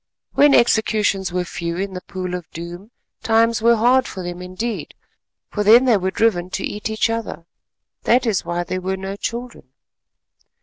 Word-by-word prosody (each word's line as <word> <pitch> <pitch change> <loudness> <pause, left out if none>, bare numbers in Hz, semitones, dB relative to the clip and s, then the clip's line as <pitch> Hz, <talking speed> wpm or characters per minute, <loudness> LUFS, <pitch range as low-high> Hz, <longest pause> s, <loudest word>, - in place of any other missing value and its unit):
When 290 0 +5
executions 215 -5 +2
were 180 0 -1
few 170 -1 -4
in 195 +1 -3
the 180 - -6
Pool 185 -1 -6
of 180 -2 -5
Doom, 175 +5 -8 0.3
times 230 0 +2
were 235 +1 +5
hard 245 +3 +3
for 190 - -7
them 175 0 -6
indeed—for 210 +2 -6
then 230 +5 +7
they 240 -5 +4
were 190 0 -1
driven 185 -4 +1
to 195 - -5
eat 210 +1 -4
each 220 0 +1
other. 225 -7 -4 0.6
That 245 +1 +3
is 215 -5 0
why 175 0 -2
there 185 +1 -4
were 190 +1 -2
no 195 +1 -5
children. 235 - -6
200 Hz, 170 wpm, -20 LUFS, 180-230 Hz, 0.6 s, then